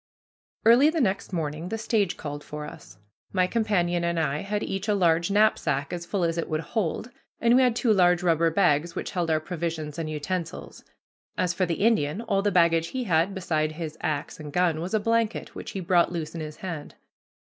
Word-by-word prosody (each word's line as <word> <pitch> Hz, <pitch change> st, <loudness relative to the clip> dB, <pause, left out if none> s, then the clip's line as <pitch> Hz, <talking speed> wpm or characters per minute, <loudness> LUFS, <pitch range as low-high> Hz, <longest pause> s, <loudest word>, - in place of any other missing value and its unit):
Early 245 Hz, +6 st, +7 dB
the 320 Hz, +1 st, -1 dB
next 195 Hz, -8 st, 0 dB
morning 160 Hz, 0 st, -3 dB
the 225 Hz, -, -2 dB
stage 220 Hz, -4 st, 0 dB
called 145 Hz, -1 st, -6 dB
for 150 Hz, 0 st, -7 dB
us. 95 Hz, -, -12 dB, 0.3 s
My 185 Hz, -2 st, +2 dB
companion 180 Hz, -5 st, 0 dB
and 170 Hz, 0 st, 0 dB
I 150 Hz, -2 st, 0 dB
had 205 Hz, +3 st, -2 dB
each 195 Hz, +2 st, -3 dB
a 210 Hz, -, +2 dB
large 170 Hz, -2 st, +2 dB
knapsack 195 Hz, -8 st, +2 dB
as 170 Hz, -1 st, -5 dB
full 195 Hz, -1 st, -1 dB
as 165 Hz, 0 st, 0 dB
it -, -, -3 dB
would 155 Hz, -1 st, -1 dB
hold, 215 Hz, +6 st, -2 dB, 0.3 s
and 235 Hz, +1 st, +4 dB
we 260 Hz, -, +6 dB
had 250 Hz, -3 st, +3 dB
two 235 Hz, -2 st, +3 dB
large 180 Hz, -2 st, +4 dB
rubber 165 Hz, -1 st, +3 dB
bags 165 Hz, -1 st, +2 dB
which -, -, -4 dB
held 175 Hz, -3 st, -1 dB
our 155 Hz, -1 st, +3 dB
provisions 160 Hz, -2 st, -4 dB
and 160 Hz, -1 st, -3 dB
utensils. 165 Hz, +3 st, -5 dB, 0.5 s
As 180 Hz, -1 st, +1 dB
for 185 Hz, +1 st, 0 dB
the 170 Hz, +5 st, 0 dB
Indian, 180 Hz, -7 st, +2 dB
all 195 Hz, -4 st, 0 dB
the 205 Hz, -, +2 dB
baggage 165 Hz, -2 st, +3 dB
he 260 Hz, +5 st, -3 dB
had, 180 Hz, -1 st, +1 dB
beside 155 Hz, -4 st, -1 dB
his 155 Hz, -1 st, -6 dB
axe 155 Hz, -3 st, -3 dB
and 150 Hz, -1 st, -7 dB
gun, 170 Hz, -1 st, +1 dB
was 185 Hz, +5 st, -2 dB
a -, -, +3 dB
blanket, 230 Hz, +1 st, 0 dB
which -, -, -7 dB
he 195 Hz, -, -3 dB
brought 175 Hz, -1 st, +3 dB
loose 165 Hz, -3 st, -4 dB
in 165 Hz, -, -5 dB
his 155 Hz, 0 st, -6 dB
hand. 165 Hz, -6 st, -7 dB
175 Hz, 210 wpm, -26 LUFS, 160-200 Hz, 0.5 s, Early